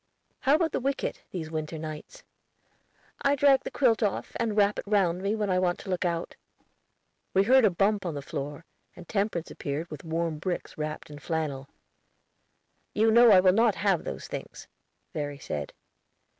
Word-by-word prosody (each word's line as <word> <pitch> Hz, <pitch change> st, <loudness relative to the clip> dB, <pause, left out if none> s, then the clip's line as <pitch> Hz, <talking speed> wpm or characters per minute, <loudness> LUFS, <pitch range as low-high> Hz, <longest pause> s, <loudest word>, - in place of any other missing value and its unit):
"How 280 Hz, +1 st, +4 dB
about 320 Hz, 0 st, +1 dB
the -, -, -1 dB
wicket, 275 Hz, +2 st, -2 dB
these 160 Hz, -4 st, -5 dB
winter 155 Hz, 0 st, -4 dB
nights?" 155 Hz, -, -8 dB, 1.0 s
"I 280 Hz, 0 st, +3 dB
drag 275 Hz, -1 st, +5 dB
the -, -, -5 dB
quilt 245 Hz, -5 st, +2 dB
off, 205 Hz, -3 st, -1 dB
and 225 Hz, -2 st, -1 dB
wrap 205 Hz, 0 st, +3 dB
it -, -, -7 dB
round 185 Hz, -4 st, +2 dB
me 200 Hz, +2 st, 0 dB
when 210 Hz, -2 st, -1 dB
I 185 Hz, -, +3 dB
want 180 Hz, -1 st, +1 dB
to 190 Hz, -, -6 dB
look 180 Hz, 0 st, -1 dB
out." 170 Hz, -1 st, -2 dB, 1.0 s
We 195 Hz, -, +5 dB
heard 255 Hz, +3 st, +5 dB
a -, -, +6 dB
bump 195 Hz, +2 st, +1 dB
on 165 Hz, -, -3 dB
the 140 Hz, -, -5 dB
floor, 145 Hz, +3 st, -6 dB, 0.3 s
and 175 Hz, -, -12 dB
Temperance 195 Hz, -5 st, -1 dB
appeared 150 Hz, +4 st, -4 dB
with 150 Hz, -, -8 dB
warm 165 Hz, -1 st, -2 dB
bricks 180 Hz, +2 st, -4 dB
wrapped 155 Hz, 0 st, -5 dB
in 145 Hz, -, -9 dB
flannel. 145 Hz, -3 st, -3 dB, 1.3 s
"You 220 Hz, +1 st, +4 dB
know 235 Hz, +2 st, +7 dB
that 210 Hz, -, +8 dB
I -, -, +8 dB
will 185 Hz, -1 st, +5 dB
not 225 Hz, -1 st, +3 dB
have 195 Hz, -4 st, +1 dB
those -, -, -6 dB
things," -, -, -8 dB, 0.5 s
Verry 145 Hz, -2 st, -3 dB
said. 75 Hz, -, -5 dB
185 Hz, 185 wpm, -28 LUFS, 155-215 Hz, 1.3 s, that